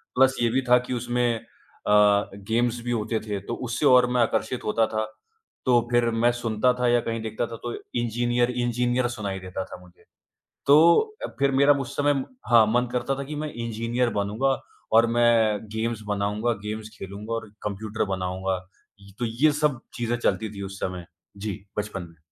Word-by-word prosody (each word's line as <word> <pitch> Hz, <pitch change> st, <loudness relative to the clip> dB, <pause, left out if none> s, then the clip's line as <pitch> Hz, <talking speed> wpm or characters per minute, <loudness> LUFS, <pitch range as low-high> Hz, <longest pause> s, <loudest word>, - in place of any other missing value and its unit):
Plus 130 Hz, +1 st, +5 dB
ये 120 Hz, -, +3 dB
भी 130 Hz, +3 st, +1 dB
था 125 Hz, -, +8 dB
कि -, -, -2 dB
उसमें 120 Hz, 0 st, 0 dB
अ, 105 Hz, -2 st, +1 dB
गेम्स 115 Hz, +4 st, 0 dB
भी 120 Hz, -, -2 dB
होते 110 Hz, -1 st, -1 dB
थे, 105 Hz, -2 st, -4 dB
तो 100 Hz, +4 st, -6 dB
उससे 125 Hz, +4 st, -2 dB
और 125 Hz, -2 st, +7 dB
मैं 125 Hz, -1 st, +2 dB
आकर्षित 115 Hz, +1 st, 0 dB
होता 110 Hz, +1 st, +2 dB
था। 110 Hz, 0 st, -1 dB, 0.6 s
तो 120 Hz, -2 st, +5 dB
फिर 120 Hz, -1 st, +3 dB
मैं 115 Hz, +1 st, +3 dB
सुनता 120 Hz, 0 st, +1 dB
था 125 Hz, -, +2 dB
या 120 Hz, 0 st, +4 dB
कहीं 115 Hz, -1 st, -3 dB
देखता 110 Hz, +1 st, -2 dB
था 115 Hz, -, -7 dB
तो 120 Hz, -1 st, -3 dB, 0.3 s
इंजीनियर 120 Hz, +1 st, +1 dB
इंजीनियर 120 Hz, 0 st, 0 dB
सुनाई 100 Hz, -5 st, -4 dB
देता 95 Hz, 0 st, -5 dB
था -, -, -10 dB
मुझे, 90 Hz, -1 st, -20 dB, 0.6 s
तो 155 Hz, +4 st, +7 dB, 0.3 s
अ, -, -, -9 dB
फिर 140 Hz, 0 st, +3 dB
मेरा 140 Hz, +2 st, +5 dB
मु 140 Hz, -, -2 dB
उस 125 Hz, -, -8 dB
समय 145 Hz, -2 st, +2 dB, 0.3 s
हाँ, 115 Hz, -2 st, +7 dB
मन 125 Hz, +1 st, +2 dB
करता 125 Hz, +2 st, 0 dB
था 140 Hz, -, -3 dB
कि 150 Hz, +3 st, -6 dB
मैं 150 Hz, 0 st, -4 dB
इंजीनियर 115 Hz, +1 st, -1 dB
बनूँगा 115 Hz, +7 st, 0 dB, 0.3 s
और 115 Hz, +1 st, +6 dB
मैं 115 Hz, -3 st, +4 dB
गेम्स 110 Hz, 0 st, -2 dB
बनाऊँगा, 105 Hz, +3 st, 0 dB
गेम्स 110 Hz, 0 st, -4 dB
खेलूँगा 100 Hz, +3 st, -7 dB
और 115 Hz, -1 st, -4 dB
कंप्यूटर 105 Hz, +2 st, -2 dB
बनाऊँगा, 95 Hz, 0 st, -2 dB, 0.4 s
ये 100 Hz, 0 st, -15 dB
तो 120 Hz, -, -1 dB
ये 125 Hz, +7 st, +3 dB
सब 145 Hz, -5 st, +2 dB
चीज़ें 120 Hz, -1 st, -1 dB
चलती 110 Hz, -2 st, 0 dB
थी 100 Hz, -, -6 dB
उस 95 Hz, 0 st, -7 dB
समय, 90 Hz, -2 st, -4 dB, 0.3 s
जी, 105 Hz, -1 st, -5 dB, 0.2 s
बचपन 105 Hz, -2 st, -3 dB
में। 85 Hz, -1 st, -21 dB
115 Hz, 190 wpm, -25 LUFS, 105-125 Hz, 0.6 s, था